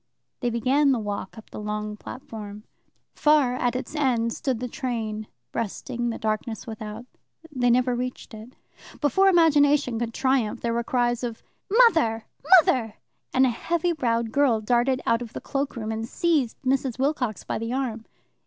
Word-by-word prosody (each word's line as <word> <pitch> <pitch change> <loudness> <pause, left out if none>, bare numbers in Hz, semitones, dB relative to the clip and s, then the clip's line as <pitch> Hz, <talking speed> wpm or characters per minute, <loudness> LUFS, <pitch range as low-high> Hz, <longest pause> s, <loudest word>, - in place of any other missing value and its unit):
They 245 - 0
began 265 +5 +2
the - - +1
walk 205 -1 -5
up 220 - -13
the - - -7
long 210 0 -4
platform. 210 -3 -9 0.5
Far 295 -5 +3
at 250 -1 0
its 255 - -4
end 240 -6 +1
stood 260 -5 -2
the 250 - -3
train, 220 -4 -4 0.2
breasting 240 +2 -3
the 230 - -3
darkness 220 +1 -3
without. 220 0 -7 0.5
They 250 -3 +1
never 250 +1 +3
reached 250 -1 -5
it. 220 +3 -11 0.4
Before 385 +7 +3
imagination 290 -8 +4
could 235 -1 -2
triumph, 260 -5 +1
there 235 -1 -1
were 235 0 0
cries 240 0 0
of 235 -2 -5 0.3
"Mother! 325 - +4 0.3
Mother!" 235 - +2 0.4
and 260 +1 +4
a - - +3
heavy 340 +8 -1
browed 230 -6 0
girl 265 -4 +3
darted 245 +4 +1
out 230 +1 +2
of 235 -2 -7
the - - -5
cloak 280 0 -3
room 220 -2 -4
and 225 +1 -4
seized 310 -9 +1
Mrs. 265 -2 0
Wilcox 260 -6 -1
by - - -3
the 230 +1 -3
arm. 245 -4 -2
240 Hz, 165 wpm, -25 LUFS, 225-270 Hz, 0.5 s, imagination